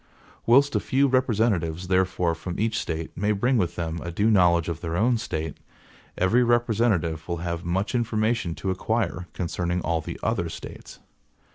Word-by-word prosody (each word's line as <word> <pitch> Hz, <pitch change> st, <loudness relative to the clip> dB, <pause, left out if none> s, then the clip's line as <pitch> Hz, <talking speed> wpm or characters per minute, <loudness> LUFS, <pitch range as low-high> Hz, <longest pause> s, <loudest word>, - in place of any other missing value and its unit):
Whilst 140 Hz, +4 st, +5 dB
a -, -, +3 dB
few 140 Hz, +1 st, +2 dB
representatives, 110 Hz, -10 st, +1 dB
therefore, 90 Hz, -2 st, +1 dB
from 85 Hz, +2 st, -6 dB
each 110 Hz, 0 st, 0 dB
State, 80 Hz, -1 st, -4 dB
may 105 Hz, +3 st, +1 dB
bring 120 Hz, +6 st, +1 dB
with 85 Hz, -3 st, -1 dB
them 85 Hz, -1 st, -3 dB
a 85 Hz, -, -5 dB
due 105 Hz, +6 st, +2 dB
knowledge 85 Hz, -5 st, +4 dB
of 85 Hz, -1 st, -4 dB
their 85 Hz, 0 st, -2 dB
own 115 Hz, +3 st, +2 dB
State, 80 Hz, -8 st, -4 dB, 0.6 s
every 100 Hz, +7 st, +3 dB
representative 110 Hz, -9 st, +1 dB
will 85 Hz, -1 st, -2 dB
have 85 Hz, 0 st, -3 dB
much 95 Hz, +6 st, -1 dB
information 110 Hz, -6 st, 0 dB
to 95 Hz, -, -2 dB
acquire 95 Hz, -2 st, -1 dB
concerning 90 Hz, 0 st, -2 dB
all 85 Hz, -1 st, 0 dB
the -, -, -7 dB
other -, -, 0 dB
States. -, -, -9 dB
95 Hz, 165 wpm, -25 LUFS, 85-115 Hz, 0.6 s, Whilst